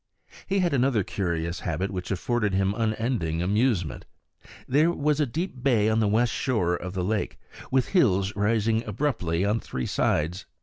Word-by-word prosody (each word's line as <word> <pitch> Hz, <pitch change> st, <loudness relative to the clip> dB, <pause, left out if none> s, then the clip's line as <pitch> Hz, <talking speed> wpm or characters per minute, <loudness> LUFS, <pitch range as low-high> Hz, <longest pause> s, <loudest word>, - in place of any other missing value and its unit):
He 195 Hz, -, 0 dB
had 180 Hz, -4 st, +1 dB
another 130 Hz, -5 st, +2 dB
curious 85 Hz, -3 st, -2 dB
habit 85 Hz, +4 st, -2 dB
which 90 Hz, -2 st, -5 dB
afforded 105 Hz, +1 st, 0 dB
him 95 Hz, +1 st, +2 dB
unending 110 Hz, -7 st, -1 dB
amusement. 100 Hz, -, 0 dB, 0.6 s
There 150 Hz, +6 st, +4 dB
was 150 Hz, -3 st, 0 dB
a 150 Hz, -, +2 dB
deep 155 Hz, 0 st, -4 dB
bay 115 Hz, -5 st, +3 dB
on 110 Hz, 0 st, +2 dB
the 110 Hz, -, +2 dB
west 110 Hz, +3 st, +2 dB
shore 90 Hz, -10 st, 0 dB
of 90 Hz, +1 st, -6 dB
the 90 Hz, -, -1 dB
lake, 105 Hz, +3 st, -1 dB, 0.3 s
with 130 Hz, -1 st, +1 dB
hills 100 Hz, -, +2 dB
rising 110 Hz, +2 st, +1 dB
abruptly 100 Hz, -, -1 dB
on 105 Hz, +3 st, +1 dB
three 65 Hz, -, -4 dB
sides. 85 Hz, +6 st, 0 dB
110 Hz, 165 wpm, -26 LUFS, 90-125 Hz, 0.6 s, There